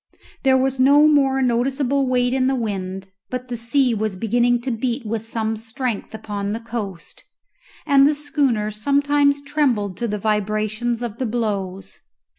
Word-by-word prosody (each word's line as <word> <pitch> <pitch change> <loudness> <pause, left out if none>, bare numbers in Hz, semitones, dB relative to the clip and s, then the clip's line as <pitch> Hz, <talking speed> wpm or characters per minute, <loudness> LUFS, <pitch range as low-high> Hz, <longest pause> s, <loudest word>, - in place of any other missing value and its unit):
There 265 -1 +4
was 265 0 0
no 285 +3 +6
more 270 -3 +3
noticeable 265 +3 +1
weight 250 0 +2
in 260 -1 +2
the 265 - +1
wind, 195 -4 -4 0.2
but 250 0 -5
the 245 - -3
sea 240 +2 +1
was 215 -2 -2
beginning 240 +4 +2
to 260 +1 -3
beat 235 +2 -2
with 220 0 -3
some 225 -1 -2
strength 225 0 -4
upon 205 -2 -4
the 225 - -3
coast, 220 -6 -6 0.6
and 280 -1 +5
the 300 - 0
schooner 275 -8 0
sometimes 285 +5 +2
trembled 255 - 0
to 235 - -2
the 210 -1 -2
vibrations 215 +3 -1
of 235 -2 -5
the 255 - -1
blows. 200 -5 -3
240 Hz, 160 wpm, -21 LUFS, 215-270 Hz, 0.6 s, no